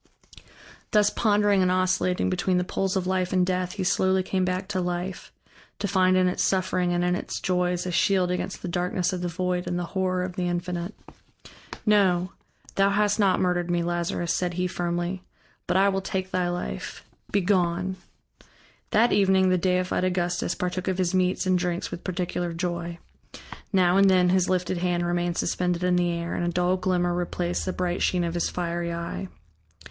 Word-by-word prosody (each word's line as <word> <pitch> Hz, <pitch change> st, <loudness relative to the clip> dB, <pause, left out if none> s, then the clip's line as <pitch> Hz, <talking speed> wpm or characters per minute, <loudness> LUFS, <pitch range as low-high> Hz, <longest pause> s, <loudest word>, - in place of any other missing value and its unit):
Thus 210 Hz, -1 st, +3 dB
pondering 205 Hz, -2 st, +3 dB
and 185 Hz, -, +3 dB
oscillating 185 Hz, 0 st, +1 dB
between 185 Hz, 0 st, +1 dB
the 180 Hz, -, +1 dB
poles 190 Hz, +1 st, -1 dB
of 190 Hz, -1 st, 0 dB
Life 185 Hz, -1 st, 0 dB
and 185 Hz, -1 st, +3 dB
Death, 180 Hz, -1 st, -1 dB
he 200 Hz, -, -3 dB
slowly 190 Hz, +1 st, +2 dB
came 185 Hz, 0 st, -1 dB
back 185 Hz, +1 st, -1 dB
to 190 Hz, -3 st, -1 dB
life, 180 Hz, +1 st, -4 dB, 0.5 s
to 205 Hz, -, -2 dB
find 185 Hz, -1 st, +3 dB
in 185 Hz, 0 st, +4 dB
its 180 Hz, -, -1 dB
suffering 185 Hz, -1 st, +1 dB
and 175 Hz, 0 st, +1 dB
in 180 Hz, 0 st, +2 dB
its -, -, -4 dB
joys 180 Hz, -1 st, 0 dB
a 180 Hz, -, -2 dB
shield 185 Hz, 0 st, +2 dB
against 180 Hz, +1 st, -4 dB
the -, -, -3 dB
darkness 180 Hz, +1 st, -1 dB
of 180 Hz, -, -3 dB
the 180 Hz, -, -1 dB
void 180 Hz, +1 st, -2 dB
and 175 Hz, -, -1 dB
the 175 Hz, -, -2 dB
horror 185 Hz, -1 st, 0 dB
of 180 Hz, -1 st, -5 dB
the 180 Hz, -1 st, 0 dB
Infinite. 175 Hz, +2 st, -3 dB, 0.9 s
"No, 190 Hz, -4 st, +3 dB, 0.4 s
thou 195 Hz, 0 st, +3 dB
hast 210 Hz, +1 st, +1 dB
not 195 Hz, -3 st, +3 dB
murdered 180 Hz, -1 st, 0 dB
me, 175 Hz, -1 st, +1 dB
Lazarus," 175 Hz, 0 st, -1 dB
said 175 Hz, -1 st, -1 dB
he 180 Hz, +1 st, 0 dB
firmly, 175 Hz, +1 st, -2 dB, 0.5 s
"but 175 Hz, -, +2 dB
I 195 Hz, +1 st, +5 dB
will 195 Hz, -1 st, 0 dB
take 190 Hz, 0 st, -3 dB
thy 180 Hz, -1 st, 0 dB
life. 120 Hz, -, -5 dB, 0.3 s
Be 200 Hz, -, +2 dB
gone." 180 Hz, -1 st, +1 dB, 0.9 s
That 230 Hz, +3 st, +3 dB
evening 190 Hz, -1 st, +4 dB
the 185 Hz, -, +3 dB
deified 185 Hz, +1 st, 0 dB
Augustus 180 Hz, -1 st, 0 dB
partook 180 Hz, +1 st, -3 dB
of 190 Hz, -1 st, 0 dB
his 185 Hz, -1 st, 0 dB
meats 185 Hz, 0 st, +1 dB
and 185 Hz, -1 st, +2 dB
drinks 175 Hz, 0 st, -2 dB
with 170 Hz, -, -7 dB
particular 175 Hz, -1 st, -2 dB
joy. 170 Hz, 0 st, -3 dB, 0.7 s
Now 185 Hz, -2 st, +4 dB
and 195 Hz, 0 st, +6 dB
then 180 Hz, -1 st, +4 dB
his 185 Hz, 0 st, +2 dB
lifted 185 Hz, -1 st, 0 dB
hand 175 Hz, -1 st, 0 dB
remained 175 Hz, 0 st, -1 dB
suspended 180 Hz, 0 st, 0 dB
in 180 Hz, 0 st, +3 dB
the 175 Hz, 0 st, +2 dB
air, 170 Hz, 0 st, -3 dB
and -, -, -2 dB
a 175 Hz, -, 0 dB
dull 180 Hz, +1 st, +1 dB
glimmer 180 Hz, -1 st, 0 dB
replaced 175 Hz, 0 st, -2 dB
the 185 Hz, -, -1 dB
bright 180 Hz, -1 st, -2 dB
sheen 180 Hz, -1 st, +1 dB
of 170 Hz, -1 st, -2 dB
his 175 Hz, -, 0 dB
fiery 170 Hz, -1 st, -3 dB
eye. 170 Hz, +3 st, -4 dB
180 Hz, 190 wpm, -25 LUFS, 175-185 Hz, 0.9 s, and